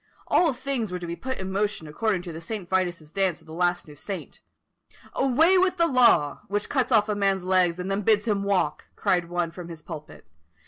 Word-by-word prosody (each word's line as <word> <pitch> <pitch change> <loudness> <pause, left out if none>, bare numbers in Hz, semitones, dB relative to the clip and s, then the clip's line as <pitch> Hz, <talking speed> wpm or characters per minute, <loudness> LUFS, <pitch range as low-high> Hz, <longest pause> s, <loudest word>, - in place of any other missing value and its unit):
All 340 -3 +3
things 250 -5 -3
were 180 - -2
to 175 - -6
be 170 0 -4
put 260 +7 -4
in 190 0 -4
motion 205 -4 -1
according 190 +4 -1
to 175 -2 -7
the 160 - -7
St. 195 +1 -5
Vitus's 175 -4 -1
dance 190 -2 0
of - - -20
the 160 - -11
last 175 0 0
new 150 - -11
saint. 190 +6 -7 0.7
"Away 320 +8 +4
with 370 0 +2
the 335 - +4
Law! 235 - +4
which 205 +2 -2
cuts 265 -2 0
off 215 -3 +4
a 210 - 0
man's 195 -2 +1
legs 180 -2 +2
and 185 +2 -3
then 195 +1 0
bids 210 +2 +2
him 205 -2 +1
walk!" 200 -2 0
cried 175 -2 +1
one 175 -1 -1
from 175 0 -9
his 165 -3 -9
pulpit. 155 -3 -9
190 Hz, 220 wpm, -25 LUFS, 175-220 Hz, 0.7 s, Away